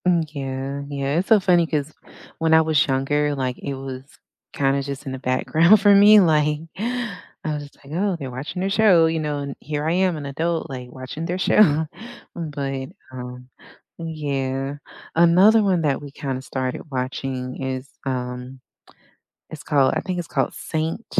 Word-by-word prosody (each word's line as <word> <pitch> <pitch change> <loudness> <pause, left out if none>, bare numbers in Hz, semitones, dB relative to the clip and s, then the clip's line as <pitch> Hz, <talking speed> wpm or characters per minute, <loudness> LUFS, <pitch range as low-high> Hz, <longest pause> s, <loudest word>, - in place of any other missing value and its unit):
Mm, 170 -3 +3
yeah, 135 0 -4
yeah, 140 +1 -2
it's 185 - -2
so 220 -2 +7
funny 175 -3 +3
'cause 150 -1 -2 0.5
when 160 0 +2
I 160 - +7
was 155 -2 +3
younger, 145 +2 +1
like, 130 -2 -2
it 140 - -4
was, 130 -1 -7 0.5
kinda, 140 0 +1
just, 140 +1 -6
in 135 - -4
the 130 - -5
background 160 +9 +4
for 205 0 +6
me, 210 +2 +8
like, 150 -4 +3 0.2
I 240 +5 -2 0.5
was, 150 -1 -2
just, 145 - -14
like, 140 - -10
"Oh, 190 +2 0
they're 140 -5 -6
watching 135 +8 -5
their 190 - 0
show, 195 -6 +5
you 160 0 0
know, 150 -2 -2
and 140 -1 -5
here 150 0 -3
I - - +2
am, 185 -2 +2
an 145 - -6
adult, 160 +4 -2
like, 125 -2 -7
watching 130 +6 -6
their 180 +1 -2
show," 160 -5 +4 0.5
but, 140 -5 -4 0.2
um, 125 0 -8 0.5
yeah. 140 -4 -3 0.4
Another 185 +7 +6
one 185 -4 +2
that 140 -2 +1
we 145 -1 -9
kinda, 135 -2 -4
started 130 +2 -4
watching 130 0 -4
is, 130 0 -4 0.2
um, 125 0 -4 0.9
it's 155 - -8
called 140 -3 +3
I - - +1
think 185 -1 -4
it's 175 - -4
called - - 0
Saint 160 +7 -3
145 Hz, 175 wpm, -22 LUFS, 135-165 Hz, 0.9 s, me